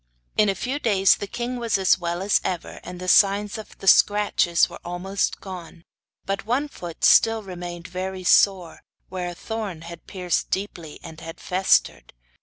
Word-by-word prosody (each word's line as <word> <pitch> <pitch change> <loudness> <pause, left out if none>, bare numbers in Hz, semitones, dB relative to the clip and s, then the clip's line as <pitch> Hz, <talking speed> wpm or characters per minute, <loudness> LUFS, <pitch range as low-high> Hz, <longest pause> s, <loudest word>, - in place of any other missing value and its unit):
In 210 -1 +3
a 195 - 0
few 260 +9 -3
days 195 -7 +3
the 205 - -6
king 240 +4 -4
was 230 -4 0
as 190 -1 +3
well 175 +1 -3
as 200 - +2
ever, 180 -2 -4
and 180 0 -9
the 185 - -6
signs 200 +2 +3
of 215 - -12
the - - -11
scratches 205 -4 +4
were - - -11
almost 180 +3 -2
gone; 180 -3 -10 0.4
but 195 0 -3
one 250 +7 0
foot 175 - -9
still 225 -1 +5
remained 175 -2 -7
very 185 +1 -5
sore, 185 -1 +3 0.3
where 180 -1 -4
a 175 - -8
thorn 210 -5 -5
had 170 0 -11
pierced 180 -3 -2
deeply 175 -6 -5
and 160 0 -10
had 165 0 -9
festered. 180 - +1
190 Hz, 175 wpm, -23 LUFS, 175-205 Hz, 0.4 s, still